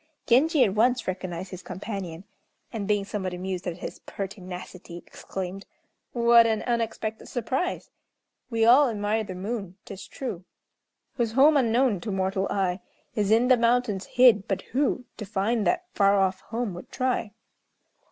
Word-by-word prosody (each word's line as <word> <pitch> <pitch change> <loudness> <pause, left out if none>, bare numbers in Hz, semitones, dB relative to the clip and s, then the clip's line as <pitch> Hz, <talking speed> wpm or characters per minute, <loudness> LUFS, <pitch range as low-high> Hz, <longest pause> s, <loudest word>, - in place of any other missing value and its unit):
Genji 280 +4 +4
at 200 -5 +1
once 245 +4 +2
recognized 185 0 -4
his 185 -1 -7
companion; 190 -5 -6 0.5
and, 210 -3 -3
being 205 -2 +1
somewhat 190 -3 -4
amused 185 0 -4
at 175 -1 -3
his - - -7
pertinacity, 185 -3 -8
exclaimed: 190 +1 -7 0.4
"What 235 -1 +5
an 220 -1 0
unexpected 225 -2 -2
surprise! 260 +8 -2 0.6
We 225 -2 +2
all 255 +4 +7
admire 215 0 -1
the 190 -3 -7
moon, 195 -1 -5
'tis 195 -1 -9
true, 215 -9 -6 0.7
Whose 230 -3 0
home 285 +5 +6
unknown 240 -5 +2
to 215 - -4
mortal 190 0 0
eye 190 -2 0 0.3
Is 210 -4 0
in 230 +3 +4
the 255 -1 +6
mountains 230 -4 +1
hid, 240 -6 +5
but 195 -1 -2
who 265 -1 +1
To 210 - -6
find 210 +2 0
that 360 0 +1
far 200 -1 +4
off 190 -1 +1
home, 230 -3 -3
would 175 - -10
try?" 250 -4 -1
210 Hz, 150 wpm, -26 LUFS, 190-240 Hz, 0.7 s, all